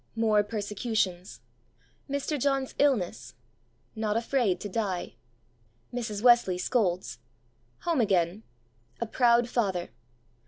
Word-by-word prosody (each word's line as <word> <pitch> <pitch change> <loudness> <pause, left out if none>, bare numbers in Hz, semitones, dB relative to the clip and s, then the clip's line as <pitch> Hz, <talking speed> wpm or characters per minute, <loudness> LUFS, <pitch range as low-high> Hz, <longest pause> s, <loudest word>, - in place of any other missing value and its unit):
More 220 -2 +3
persecutions. 205 -3 -2 0.7
Mr. 285 +1 -2
John's 270 0 0
illness. 260 -11 +1 0.6
Not 220 -1 0
afraid 230 -6 +1
to - - -4
die. 195 -3 -3 0.8
Mrs. 220 -4 -4
Wesley 240 -7 +5
scolds. 180 - -1 0.6
Home 335 -7 +1
again. 190 -2 +1 0.6
A 235 - -1
proud 235 +1 +3
father. 195 -8 -1
220 Hz, 95 wpm, -28 LUFS, 190-245 Hz, 0.8 s, Wesley